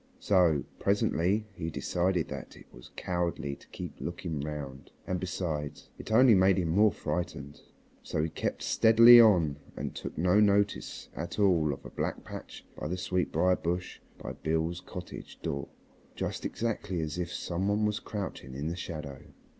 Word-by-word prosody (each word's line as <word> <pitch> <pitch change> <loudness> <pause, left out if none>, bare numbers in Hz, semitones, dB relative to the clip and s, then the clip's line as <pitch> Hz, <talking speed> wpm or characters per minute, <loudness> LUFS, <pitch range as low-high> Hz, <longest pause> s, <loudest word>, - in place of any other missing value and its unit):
So 85 -7 +3 0.2
presently 100 +1 +1
he 80 -3 -4
decided 90 +1 0
that - - -7
it - - -15
was - - -13
cowardly 85 -5 -2
to - - -20
keep 90 -4 -8
looking 85 -3 -4
round, 70 -2 -6 0.2
and 90 -1 -2
besides, 80 -5 -4
it - - -8
only 120 +2 +7
made 95 0 +5
him 85 -3 0
more 105 +5 +5
frightened. 70 -5 -4 0.4
So 75 - -2
he 80 - -1
kept 80 - -3
steadily 115 +2 +8
on 85 -10 +4 0.2
and - - -4
took - - -7
no 90 +5 +4
notice 100 -1 +1
at 85 +4 -5
all 90 -7 +3
of 70 - -7
a - - -8
black - - -3
patch - - -9
by - - -5
the 90 +4 -2
sweetbrier 90 0 +1
bush 90 +2 -3 0.2
by - - -6
Beale's 80 +2 -1
cottage 90 -1 -9
door 70 0 -3 0.5
just - - -4
exactly 105 -5 -3
as 80 +2 -3
if 90 0 -3
some 90 +2 -2
one 105 +1 +2
was 105 0 0
crouching 95 -11 -6
in 75 +4 -3
the 85 - -3
shadow. 75 -6 -6
90 Hz, 165 wpm, -30 LUFS, 80-100 Hz, 0.5 s, steadily